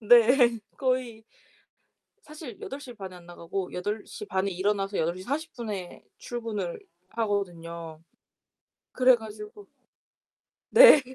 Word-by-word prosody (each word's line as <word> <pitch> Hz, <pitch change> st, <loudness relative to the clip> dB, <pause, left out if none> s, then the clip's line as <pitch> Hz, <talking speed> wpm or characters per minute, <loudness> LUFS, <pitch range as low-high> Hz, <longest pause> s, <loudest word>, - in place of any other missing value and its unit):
네. 235 Hz, +2 st, +6 dB, 0.2 s
거의 255 Hz, -4 st, -1 dB, 1.0 s
사실 300 Hz, -7 st, -10 dB
8:30 240 Hz, -9 st, -7 dB
에 -, -, -10 dB
안 175 Hz, -1 st, -15 dB
나가고 175 Hz, +2 st, -5 dB
8:30에 200 Hz, 0 st, -3 dB
일어나서 195 Hz, +2 st, 0 dB
8:40 220 Hz, -, -3 dB
에 185 Hz, -3 st, -6 dB, 0.2 s
출근을 220 Hz, -7 st, -4 dB, 0.3 s
하거든요. 170 Hz, -7 st, -3 dB, 0.9 s
그래 255 Hz, 0 st, +6 dB
가지고 215 Hz, -, -10 dB, 1.0 s
네. 485 Hz, -10 st, +10 dB
210 Hz, 155 characters per minute, -27 LUFS, 185-245 Hz, 1.0 s, 네